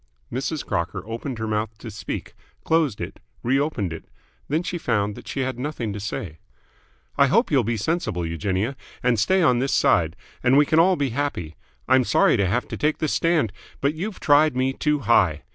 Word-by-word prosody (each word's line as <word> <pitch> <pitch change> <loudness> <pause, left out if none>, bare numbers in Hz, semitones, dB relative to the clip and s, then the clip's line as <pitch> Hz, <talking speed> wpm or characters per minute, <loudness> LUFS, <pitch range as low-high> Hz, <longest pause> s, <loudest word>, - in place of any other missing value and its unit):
Mrs. 135 +4 -2
Crocker 85 0 -2
opened 115 +3 -5
her 110 - -3
mouth 110 0 -2
to 110 0 -8
speak, 105 - -6 0.3
closed 160 -9 +1
it, - - -6 0.2
re 130 +3 +2
opened 115 - -1
it. 80 - -9 0.4
Then 155 +4 0
she 175 0 -3
found 105 -7 0
that - - -12
she 135 - -3
had 130 -2 -2
nothing 125 -6 -3
to 105 - -5
say. 95 -5 -5 0.8
"I 140 - +6
hope 230 - +2
you'll 135 -4 +4
be 115 +1 -1
sensible, 105 - -1
Eugenia, 95 - -1 0.3
and 120 -3 +2
stay 185 - +3
on 125 -6 +4
this 135 +2 +1
side, 80 0 +3 0.3
and 130 +2 +4
we 145 - +6
can 155 +2 +3
all 185 +3 +5
be 140 -4 0
happy. 115 - -3 0.3
I'm 130 0 +5
sorry - - +4
to 100 -2 +2
have 120 +7 0
to - - -4
take 150 +1 +1
this 155 - -1
stand, 165 - +1 0.3
but 140 +2 +1
you 185 +8 -3
tried 150 -4 +3
me 130 +1 +1
too 150 0 0
high. 90 - +3
125 Hz, 200 wpm, -23 LUFS, 105-150 Hz, 0.8 s, I